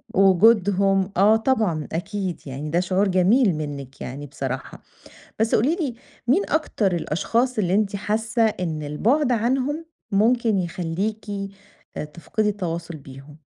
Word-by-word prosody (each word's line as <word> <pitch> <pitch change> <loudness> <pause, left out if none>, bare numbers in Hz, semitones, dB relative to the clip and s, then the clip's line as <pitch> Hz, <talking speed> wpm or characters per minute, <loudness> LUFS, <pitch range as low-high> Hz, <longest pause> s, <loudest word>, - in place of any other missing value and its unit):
وجودهم 195 0 +4
آه، 210 +3 +6
طبعًا 220 - 0
أكيد، 190 +1 -3
يعني 140 +3 -5
ده 170 +3 +2
شعور 190 +2 +1
جميل 190 +2 +3
منِّك 140 -3 -6
يعني 145 +3 -6
بصراحة، 135 -1 -5 0.6
بس 225 0 +2
قولي 280 +9 +2
لي 295 -9 -2 0.3
مين 365 +11 +4
أكتر 215 - +1
الأشخاص 230 +10 0
اللي 185 -2 +1
أنتِ 205 -1 +1
حاسة 215 +3 -1
إن 170 -7 -2
البعد 240 - +1
عنهم 265 +7 0 0.3
ممكن 225 +1 +3
يخليكِ 180 +4 -3 0.7
آآ، - - -2
تفقدي 170 +8 -2
التواصل 170 -4 -4
بيهم؟ 140 +2 -13
195 Hz, 130 wpm, -23 LUFS, 165-225 Hz, 0.7 s, آه